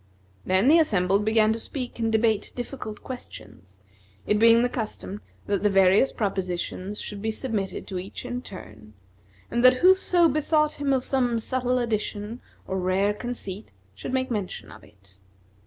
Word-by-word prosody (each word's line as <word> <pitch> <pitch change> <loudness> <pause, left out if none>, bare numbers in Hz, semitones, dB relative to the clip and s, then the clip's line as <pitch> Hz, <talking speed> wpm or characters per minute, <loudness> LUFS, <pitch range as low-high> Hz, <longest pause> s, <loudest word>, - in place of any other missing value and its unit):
Then 190 +5 +2
the 320 +4 +7
assembly 195 - +2
began 220 +1 +3
to 225 - -4
speak 250 +1 -6
and 225 -1 0
debate 220 -1 +1
difficult 245 -3 -6
questions, 100 - -10 0.5
it 210 - +2
being 230 +1 +6
the - - +3
custom 215 -4 -5 0.2
that 200 -1 0
the 210 - +3
various 195 +5 +4
propositions 190 -1 -3
should 205 -1 -6
be 220 - -1
submitted 220 -4 -3
to 185 -2 -4
each 190 +6 -8
in 245 0 -4
turn, 110 - -11 0.6
and 240 - 0
that 255 0 +8
whoso 365 -2 +5
bethought 305 0 +1
him 280 -1 +1
of 260 -2 +2
some 250 -4 +1
subtle 250 +2 -1
addition 220 -1 -3 0.2
or 190 - -2
rare 190 +3 +1
conceit, 210 -3 -6 0.2
should 95 - -7
make 260 0 -1
mention 205 -5 -4
of - - -13
it. 95 -2 -21
220 Hz, 160 wpm, -25 LUFS, 195-250 Hz, 0.6 s, that